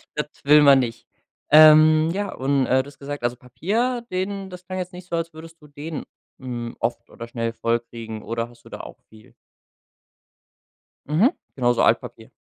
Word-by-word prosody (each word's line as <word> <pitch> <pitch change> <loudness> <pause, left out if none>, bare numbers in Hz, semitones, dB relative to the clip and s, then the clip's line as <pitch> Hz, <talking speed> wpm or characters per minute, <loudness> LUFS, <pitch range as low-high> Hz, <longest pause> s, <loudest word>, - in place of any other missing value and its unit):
Das 150 - -2 0.2
will 150 +1 +7
man 140 -2 +7
nicht. 115 -2 -4 0.4
Ähm, 155 +1 +7
ja, 200 0 -3
und 135 0 0
äh, 130 +1 +3
du - - -14
hast 145 - -15
gesagt, 145 -1 -6
also, 120 0 0
Papier, 220 - -2
den 190 +1 -3
das 180 0 -11
klang 185 +1 -5
jetzt 180 0 -5
nicht 180 0 -11
so, - - -2
als 165 0 -3
würdest 165 +1 -13
du 150 - -15
den, 150 +2 -7 0.4
hm, 120 -2 -6
oft 115 +1 -3
oder 115 - -9
schnell 115 -1 -3
voll 115 0 0
kriegen 115 -2 -9
oder 115 +1 -3
hast 120 -1 -20
du - - -15
da - - -8
auch - - -12
viel? 110 0 -18 1.7
Mhm. 175 - +3 0.2
Genau, 120 -2 +2
so 120 - 0
Altpapier. - - 0
145 Hz, 190 wpm, -23 LUFS, 120-165 Hz, 1.7 s, will